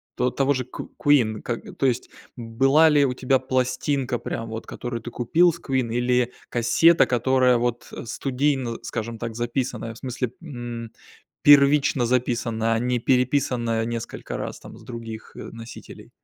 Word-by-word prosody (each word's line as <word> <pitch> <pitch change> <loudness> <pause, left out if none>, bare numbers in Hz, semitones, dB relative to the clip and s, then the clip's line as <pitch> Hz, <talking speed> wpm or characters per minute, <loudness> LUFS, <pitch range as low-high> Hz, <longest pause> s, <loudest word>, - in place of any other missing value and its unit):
то 125 - +1
того 135 +3 +1
же 130 -2 -3
ку - - -9
Queen? 120 -7 +3
Ка 120 - -3 0.2
то - - -2
есть 125 -1 0 0.3
была 135 +7 +3
ли 145 -2 +4
у 130 - 0
тебя 130 +1 +1
пластинка 130 0 -1
прям 115 0 -5
вот, 110 0 -6
которую 120 -1 -5
ты 120 - -8
купил 165 +9 +3
с 170 - -10
Queen, 130 -6 -1
или 125 0 +1 0.2
кассета, 125 +8 +4
которая 125 0 +3
вот 120 0 -2
студийно, 130 -1 -1
скажем 115 +1 -4
так, 115 0 -5
записанная, 120 -1 -3
в - - -14
смысле, 125 -1 -4
м, 120 -7 -7 0.5
первично 140 -2 +5
записана, 115 -2 0
а 115 - +1
не 125 +1 0
переписанная 125 -3 +1
несколько 115 -1 -5
раз - - -5
там - - -12
с - - -15
других, 115 -2 -8
э, - - -10
носителей? 115 0 -11
125 Hz, 160 wpm, -24 LUFS, 115-135 Hz, 0.5 s, первично